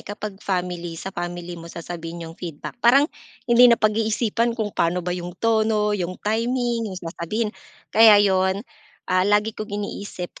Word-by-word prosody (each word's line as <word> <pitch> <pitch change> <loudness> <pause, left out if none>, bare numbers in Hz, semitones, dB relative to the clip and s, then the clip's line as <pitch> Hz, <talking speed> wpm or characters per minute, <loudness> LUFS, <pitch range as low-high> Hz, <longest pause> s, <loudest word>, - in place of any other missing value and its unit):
kapag 205 -1 -7
family, 180 -3 -3
sa 195 +4 -6
family 175 -1 -5
mo 165 - -10
sasabihin 170 0 -7
yung 165 - -8
feedback. 165 -3 -7
Parang 255 +5 +6 0.4
hindi 245 0 +7
napag-iisipan 225 +1 +1
kung 215 -3 -2
paano 170 +1 0
ba 180 - -1
yung 175 0 -6
tono, 215 -1 +2
yung 185 -3 -2
timing, 230 +1 0
yung 190 - -7
sasabihin, 185 +5 -3 0.4
kaya 220 -1 +8
'yon, 190 0 +2 0.5
ah, 185 +1 +3
lagi 210 +2 +2
kong 215 -1 -5
iniisip 200 -3 -6
205 Hz, 150 wpm, -23 LUFS, 175-220 Hz, 0.5 s, kaya